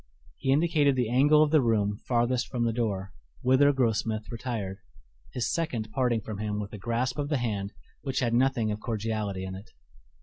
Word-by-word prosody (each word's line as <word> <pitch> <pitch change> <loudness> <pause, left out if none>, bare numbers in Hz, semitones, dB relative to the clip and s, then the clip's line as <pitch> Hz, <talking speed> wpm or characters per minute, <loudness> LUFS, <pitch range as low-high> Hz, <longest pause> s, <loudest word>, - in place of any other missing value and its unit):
He 135 - +1
indicated 150 -2 +3
the 125 -3 0
angle 145 +4 +5
of 150 - 0
the 155 -2 +5
room 105 -4 +1
farthest 120 0 +1
from 120 -2 -2
the 115 - +1
door, 100 -5 -2 0.3
whither 130 +3 +5
Grossmith 110 -4 0
retired, 110 -5 -4 0.5
his 120 - -1
second 120 -10 -2
parting 120 -3 +1
from 105 0 -6
him 105 -1 -2
with 105 0 -6
a 105 - -7
grasp 120 +5 -1
of 145 0 -2
the 150 - +1
hand 105 -5 -2 0.3
which 135 -2 -4
had 120 -3 0
nothing 120 -3 +2
of 105 - -3
cordiality 105 -3 -3
in 95 0 -5
it. 100 +4 -10
115 Hz, 190 wpm, -28 LUFS, 105-130 Hz, 0.5 s, angle